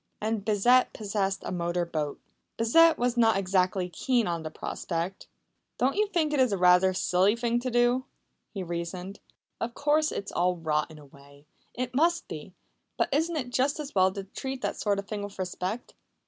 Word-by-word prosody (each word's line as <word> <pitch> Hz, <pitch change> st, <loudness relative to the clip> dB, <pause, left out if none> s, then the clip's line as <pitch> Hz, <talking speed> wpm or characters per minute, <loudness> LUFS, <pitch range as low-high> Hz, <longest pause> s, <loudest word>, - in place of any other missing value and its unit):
And 215 Hz, -1 st, -2 dB
Bissett 235 Hz, +5 st, +3 dB
possessed 200 Hz, -2 st, -2 dB
a -, -, -3 dB
motor 175 Hz, 0 st, -1 dB
boat. 155 Hz, -3 st, -3 dB, 0.4 s
Bissett 325 Hz, +9 st, +5 dB
was 245 Hz, 0 st, 0 dB
not 225 Hz, -3 st, +4 dB
exactly 185 Hz, -1 st, +1 dB
keen 240 Hz, +6 st, 0 dB
on 170 Hz, -2 st, -2 dB
the 160 Hz, -, -5 dB
prospect. 170 Hz, +3 st, -4 dB, 0.5 s
"Don't 260 Hz, +2 st, +1 dB
you 425 Hz, +1 st, +2 dB
think 325 Hz, -6 st, 0 dB
it 290 Hz, -, +1 dB
is 250 Hz, -6 st, +3 dB
rather 180 Hz, 0 st, +5 dB
a 185 Hz, -, -3 dB
silly 185 Hz, +3 st, +3 dB
thing 235 Hz, 0 st, 0 dB
to 255 Hz, +1 st, -3 dB
do?" 240 Hz, +2 st, +2 dB, 0.5 s
he 195 Hz, -3 st, -5 dB
reasoned. 175 Hz, +3 st, -5 dB, 0.4 s
"Of 235 Hz, +1 st, -4 dB
course 300 Hz, +1 st, +2 dB
it's 200 Hz, -, -5 dB
all 180 Hz, +1 st, +1 dB
rot 155 Hz, -2 st, 0 dB
in 160 Hz, -, -12 dB
a 150 Hz, -, -13 dB
way 140 Hz, +1 st, -18 dB, 0.3 s
it 250 Hz, +1 st, -3 dB
must 335 Hz, +5 st, +2 dB
be. -, -, -8 dB, 0.4 s
But -, -, 0 dB
isn't 325 Hz, +4 st, +1 dB
it 250 Hz, -4 st, -4 dB
just 270 Hz, +4 st, +1 dB
as 290 Hz, -2 st, -6 dB
well 190 Hz, -1 st, +4 dB
to 195 Hz, -, -5 dB
treat 265 Hz, +7 st, -6 dB
that -, -, -1 dB
sort 205 Hz, -2 st, +1 dB
of 200 Hz, 0 st, -5 dB
thing 210 Hz, -1 st, -4 dB
with 205 Hz, 0 st, -7 dB
respect?" 185 Hz, +4 st, -4 dB
205 Hz, 190 wpm, -28 LUFS, 180-250 Hz, 0.5 s, Bissett